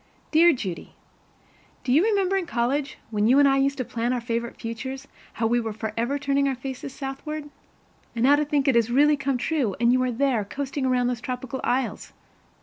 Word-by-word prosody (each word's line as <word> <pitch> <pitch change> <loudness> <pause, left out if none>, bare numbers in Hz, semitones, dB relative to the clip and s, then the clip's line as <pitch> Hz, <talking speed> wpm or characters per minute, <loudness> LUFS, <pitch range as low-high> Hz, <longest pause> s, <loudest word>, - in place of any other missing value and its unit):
Dear 335 +2 +6
Judy: 190 - -5 0.9
Do 250 -1 +1
you 310 +6 +5
remember 395 -3 +2
in 375 -3 -1
college, 270 +1 -1
when 210 0 +1
you 255 +4 +5
and 285 0 +6
I 270 0 +3
used 275 0 +1
to 255 - -2
plan 235 +2 -1
our 250 - 0
favorite 235 0 -4
futures, 260 +4 -6 0.3
how 225 - -2
we 240 +2 +2
were 225 -2 -3
forever 225 +5 -2
turning 280 0 +1
our 270 - 0
faces 265 +2 -6
southward? 290 +3 -6 0.6
And 230 - -1
now 280 +3 +6
to 300 - +1
think 290 -1 0
it 270 - +5
has 235 -1 +3
really 295 +4 +4
come 275 -2 -1
true, 245 - -1
and 235 +1 +4
you 255 - +3
are 255 0 0
there, 245 -2 +1
coasting 270 +5 -3
around 250 -1 +2
those 245 -1 -1
tropical 255 0 -5
isles! 255 0 -2
260 Hz, 205 wpm, -25 LUFS, 235-280 Hz, 0.9 s, Dear